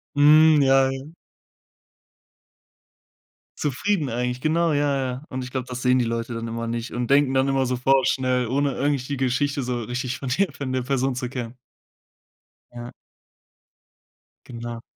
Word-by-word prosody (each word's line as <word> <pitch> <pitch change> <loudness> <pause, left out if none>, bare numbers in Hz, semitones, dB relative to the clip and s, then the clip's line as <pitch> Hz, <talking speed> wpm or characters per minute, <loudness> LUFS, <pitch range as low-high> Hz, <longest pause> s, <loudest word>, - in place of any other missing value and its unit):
Mhm. 150 +1 +6
Ja, 135 0 +4
ja. 135 +3 -7 2.5
Zufrieden 150 +3 -1
eigentlich, 125 +1 -2
genau, 165 +2 +1
ja, 145 -1 +1
ja. 130 +2 -4
Und 130 -1 -5
ich 125 - -8
glaube, 130 -1 -4
das 125 0 -6
sehen 125 0 +3
die 120 - +1
Leute 115 +1 -3
dann 115 0 -4
immer 115 0 -4
nicht 115 +1 -4
und 120 +1 -3
denken 140 -1 +4
dann 130 +1 +2
immer 135 -1 +1
so 125 0 -1
vorschnell, 130 -1 +2
ohne 140 +2 0
eigentlich 140 -2 0
die 140 - -3
Geschichte 135 +2 0
so 120 -1 -3
richtig 125 +1 -4
von 135 - -5
der 200 -2 +1
von 130 -2 -5
der 130 -1 -1
Person 135 0 0
zu 125 -1 -4
kennen. 125 -2 -6 1.2
Ja. 120 0 -8 1.5
Genau. 120 -1 -7
130 Hz, 155 wpm, -23 LUFS, 125-140 Hz, 2.5 s, Mhm